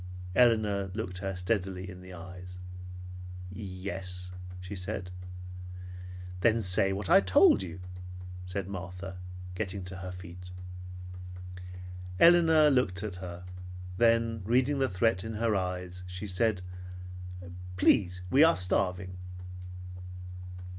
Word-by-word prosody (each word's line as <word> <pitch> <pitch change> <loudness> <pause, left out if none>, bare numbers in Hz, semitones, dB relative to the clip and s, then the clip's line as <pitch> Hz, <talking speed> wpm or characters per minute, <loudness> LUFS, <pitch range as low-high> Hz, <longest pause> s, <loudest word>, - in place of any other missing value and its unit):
Elinor 105 -5 +5
looked 95 -5 -3
her 95 -1 -2
steadily 95 0 0
in 90 -1 -8
the 90 0 -10
eyes. 90 +1 -8 0.9
"Yes," 95 -2 -4 0.3
she 90 +2 -6
said. 90 0 -2 1.3
"Then 115 +3 +4
say 95 +1 +4
what 95 0 -1
I 95 - +8
told 95 +1 +7
you," 95 -1 -5 0.6
said 90 +1 -2
Martha, 90 0 -5 0.3
getting 95 -1 -2
to 90 +1 -6
her 95 -1 -5
feet. 90 0 -8 1.7
Elinor 160 -2 +8
looked 100 -8 +2
at 100 -4 -3
her, 90 -1 -6 0.5
then 115 -1 +4
reading 130 +6 +3
the 135 - +3
threat 95 0 +3
in 110 0 -4
her 110 0 +2
eyes, 90 -1 -2
she 90 +2 -5
said, 100 0 +2 1.1
"Please, 90 -1 +4
we 140 +4 +8
are 165 +1 +7
starving." 90 0 +1
95 Hz, 115 wpm, -31 LUFS, 90-110 Hz, 1.7 s, I